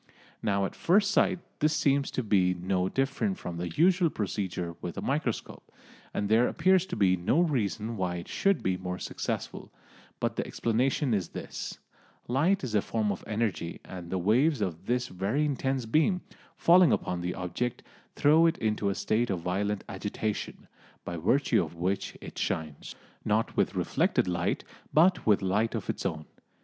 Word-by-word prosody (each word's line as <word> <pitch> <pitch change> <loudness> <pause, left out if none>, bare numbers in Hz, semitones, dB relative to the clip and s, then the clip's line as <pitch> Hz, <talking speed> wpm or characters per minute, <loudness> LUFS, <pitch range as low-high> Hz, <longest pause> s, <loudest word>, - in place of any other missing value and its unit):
Now 100 -2 +1
at - - -4
first 200 +3 +3
sight 185 -1 +3 0.2
this 155 +1 +2
seems 140 -1 +2
to 130 - -2
be 95 -4 +3
no 90 +1 0
different 140 - 0
from 85 -1 -6
the 85 0 -3
usual 175 - +3
procedure 95 - -3
with 85 - -5
a - - -1
microscope, 135 -4 -3 0.4
and 105 - -1
there 115 +3 +4
appears 185 +2 +3
to - - -4
be 95 -3 +4
no 90 - +1
reason 115 - -1
why 90 -2 -1
it 85 0 -6
should 195 -1 +1
be 95 -1 +1
more 90 0 -4
successful, - - -4 0.5
but - - -1
the - - -1
explanation 125 +3 0
is 95 -5 -1
this: - - -6 0.5
light 155 +10 +2
is 125 -4 -3
a 105 - +3
form 110 -1 -1
of 95 - -5
energy, 105 -6 -2
and 90 -2 -8
the 95 - -1
waves 125 - +3
of 90 -6 -3
this 125 +1 0
very 100 +11 -1
intense 135 -3 -1
beam, 160 - +2 0.4
falling 175 0 +6
upon 90 -1 -1
the 90 +1 -3
object, 95 +7 -3 0.3
throw 160 +3 +5
it 165 - +1
into 105 -2 0
a 100 - -1
state 115 +4 0
of 90 -3 -1
violent 100 +4 -1
agitation, 105 +2 -4 0.4
by 85 - -4
virtue 115 - +2
of - - -8
which 90 +4 -2
it - - -8
shines, 75 -3 -3 0.3
not 110 +1 0
with - - +1
reflected - - +1
light, 85 -1 -1 0.3
but 175 0 +4
with 105 -2 +4
light 105 +4 +1
of - - -2
its - - -3
own. 80 -1 -5
110 Hz, 175 wpm, -29 LUFS, 90-140 Hz, 0.5 s, falling